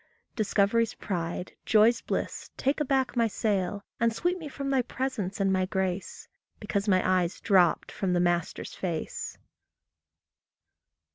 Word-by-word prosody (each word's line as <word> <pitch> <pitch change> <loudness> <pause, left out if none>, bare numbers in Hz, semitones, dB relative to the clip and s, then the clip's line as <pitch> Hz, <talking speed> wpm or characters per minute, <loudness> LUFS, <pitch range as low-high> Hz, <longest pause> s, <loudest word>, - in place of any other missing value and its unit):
Discovery's 220 +1 +2
pride, 175 -1 -4
joy's 220 +2 +4
bliss, - - -3
take 275 +3 +1
aback 270 -3 +1
my 230 -1 +3
sail, 200 -2 -1
And 230 0 +3
sweep 350 +10 -1
me 320 - -6
from 275 -1 -4
thy 265 -2 +3
presence 240 -7 -3
and 195 -1 +2
my 185 -1 +1
grace, 190 -1 -3 0.3
Because 200 +1 -2
my 185 -2 +3
eyes 185 -1 +1
dropped 185 -5 +3
from 190 -2 -1
the 175 - +2
master's 175 -1 0
face. 170 -4 -4
200 Hz, 135 wpm, -28 LUFS, 185-235 Hz, 0.3 s, joy's